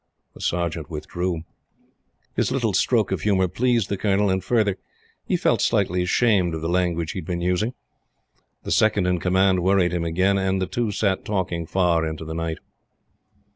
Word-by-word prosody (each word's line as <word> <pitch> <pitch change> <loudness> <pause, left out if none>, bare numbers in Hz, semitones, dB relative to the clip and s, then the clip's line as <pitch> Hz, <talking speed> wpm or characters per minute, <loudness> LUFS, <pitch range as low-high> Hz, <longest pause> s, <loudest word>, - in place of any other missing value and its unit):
The - - -13
Sergeant 85 -3 -2
withdrew. 85 +2 -3 0.9
His - - 0
little - - 0
stroke - - +2
of - - -1
humor 95 -3 +2
pleased 115 +3 +1
the 100 - -2
Colonel, 100 -1 +2
and, 95 0 -1
further, 105 -5 +1 0.5
he - - +1
felt - - +1
slightly 90 +1 +1
ashamed 90 -2 +2
of 80 - -5
the 80 - -2
language 85 -2 0
he - - -5
had 85 - -8
been 90 -1 -2
using. 90 +8 0 0.9
The - - -5
Second 105 -3 +3
in 90 -1 +1
Command 95 +1 +2
worried 95 -1 +3
him 85 -1 -1
again, 95 +4 +1
and 95 0 0
the 95 - 0
two 120 +3 -2
sat 100 -2 0
talking 90 -5 -2
far 85 -3 +2
into 80 0 -4
the 80 - -5
night. 80 0 -3
90 Hz, 175 wpm, -23 LUFS, 85-100 Hz, 0.9 s, Second